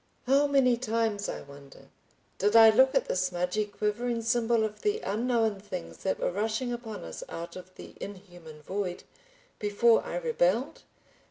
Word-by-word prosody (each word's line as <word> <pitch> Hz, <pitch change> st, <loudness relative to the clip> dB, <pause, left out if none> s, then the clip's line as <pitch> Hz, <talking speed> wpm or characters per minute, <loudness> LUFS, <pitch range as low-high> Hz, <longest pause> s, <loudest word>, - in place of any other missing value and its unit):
How 275 Hz, +3 st, +4 dB
many 265 Hz, -4 st, +3 dB
times 225 Hz, -4 st, -1 dB
I -, -, -5 dB
wonder 140 Hz, -1 st, -15 dB, 0.5 s
did 205 Hz, +3 st, +2 dB
I 225 Hz, -1 st, +9 dB
look 260 Hz, +4 st, +4 dB
at -, -, +2 dB
the -, -, -1 dB
smudgy, 180 Hz, +3 st, 0 dB
quivering 230 Hz, +3 st, -2 dB
symbol 230 Hz, 0 st, +2 dB
of 215 Hz, -1 st, -4 dB
the 420 Hz, +1 st, 0 dB
unknown 225 Hz, -1 st, 0 dB
things 190 Hz, -3 st, -7 dB
that 190 Hz, -, -2 dB
were -, -, 0 dB
rushing 220 Hz, +5 st, -1 dB
upon 235 Hz, -2 st, -7 dB
us 80 Hz, -1 st, -7 dB
out 170 Hz, +1 st, -7 dB
of 185 Hz, 0 st, -11 dB
the -, -, -11 dB
inhuman 175 Hz, -6 st, -10 dB
void, 185 Hz, 0 st, -4 dB, 0.6 s
before 215 Hz, +3 st, +3 dB
I -, -, -6 dB
rebelled? -, -, 0 dB
215 Hz, 160 wpm, -28 LUFS, 185-240 Hz, 0.6 s, I